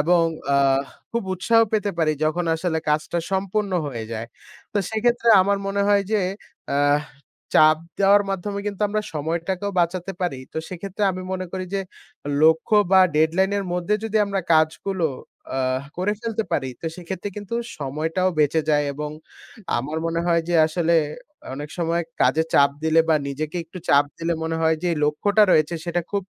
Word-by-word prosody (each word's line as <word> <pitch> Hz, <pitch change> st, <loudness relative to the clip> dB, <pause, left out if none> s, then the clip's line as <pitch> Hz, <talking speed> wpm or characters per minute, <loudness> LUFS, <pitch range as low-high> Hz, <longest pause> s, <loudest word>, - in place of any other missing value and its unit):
এবং 170 Hz, +2 st, +4 dB, 0.3 s
আ -, -, +5 dB, 0.5 s
খুব 235 Hz, -1 st, -1 dB
উৎসাহ 225 Hz, +5 st, +3 dB
পেতে 205 Hz, -2 st, +1 dB
পারি 155 Hz, -2 st, +2 dB
যখন 170 Hz, +3 st, 0 dB
আসলে 160 Hz, 0 st, -1 dB
কাজটা 155 Hz, +3 st, 0 dB
সম্পূর্ণ 195 Hz, +1 st, -1 dB
হয়ে 115 Hz, -5 st, -5 dB
যায়। 115 Hz, +1 st, -4 dB, 0.5 s
তো 210 Hz, -, +1 dB
সেক্ষেত্রে 235 Hz, +2 st, +1 dB
আমার 200 Hz, +1 st, +1 dB
মনে 200 Hz, 0 st, 0 dB
হয় 205 Hz, -1 st, +4 dB
যে, 215 Hz, -, +3 dB, 0.5 s
আ -, -, +1 dB, 0.8 s
চাপ 155 Hz, 0 st, +6 dB, 0.2 s
দেওয়ার 200 Hz, +1 st, +5 dB
মাধ্যমে 200 Hz, +2 st, -3 dB
কিন্তু 205 Hz, 0 st, -4 dB
আমরা 210 Hz, +1 st, -1 dB
সময়টাকেও 170 Hz, +6 st, -2 dB
বাঁচাতে 180 Hz, +2 st, -1 dB
পারি। 145 Hz, -7 st, -1 dB
তো -, -, -10 dB
সেক্ষেত্রে 190 Hz, +3 st, -6 dB
আমি 185 Hz, 0 st, -6 dB
মনে 185 Hz, 0 st, -3 dB
করি 185 Hz, -1 st, -3 dB
যে, 195 Hz, -, +1 dB, 0.6 s
লক্ষ্য 160 Hz, +6 st, +4 dB, 0.2 s
বা 190 Hz, -, +8 dB, 0.2 s
ডেডলাইন 170 Hz, +5 st, +3 dB
এর 200 Hz, -, -3 dB
মধ্যে 180 Hz, +3 st, 0 dB
যদি 220 Hz, 0 st, -1 dB
আমরা 200 Hz, -1 st, -1 dB
কাজগুলো 160 Hz, +3 st, +2 dB, 0.5 s
আ -, -, 0 dB, 0.4 s
করে 185 Hz, +4 st, 0 dB
ফেলতে 225 Hz, -1 st, -2 dB
পারি 130 Hz, -, 0 dB
তো 165 Hz, -, -5 dB
সেক্ষেত্রে 180 Hz, +2 st, -5 dB
কিন্তু 205 Hz, +2 st, -5 dB, 0.2 s
সময়টাও 155 Hz, +6 st, -1 dB
বেঁচে 150 Hz, +1 st, +3 dB
যায় 145 Hz, -1 st, +3 dB
এবং 150 Hz, +1 st, -5 dB, 0.7 s
আমার 150 Hz, +6 st, -3 dB
মনে 165 Hz, 0 st, -1 dB
হয় 170 Hz, -1 st, +3 dB
যে, 175 Hz, -, 0 dB
আসলে 170 Hz, +1 st, +1 dB, 0.6 s
অনেক 145 Hz, +2 st, -6 dB
সময় 170 Hz, 0 st, 0 dB, 0.2 s
কাজে 160 Hz, -, +3 dB
চাপ 140 Hz, 0 st, +6 dB
দিলে 160 Hz, +1 st, +4 dB
বা 160 Hz, -, +5 dB
নিজেকে 150 Hz, +4 st, -4 dB
একটু 170 Hz, +3 st, -10 dB
চাপ 140 Hz, +1 st, +5 dB
দিলে 170 Hz, +1 st, -1 dB
মনে 165 Hz, 0 st, -2 dB
হয় 160 Hz, 0 st, +3 dB
যে, 180 Hz, -, -1 dB
এই 155 Hz, -, -2 dB
লক্ষ্যটা 205 Hz, +8 st, +2 dB
রয়েছে 155 Hz, +2 st, +3 dB
সেটা 175 Hz, +1 st, 0 dB
খুব 200 Hz, -1 st, -1 dB
175 Hz, 170 wpm, -23 LUFS, 155-200 Hz, 0.8 s, বা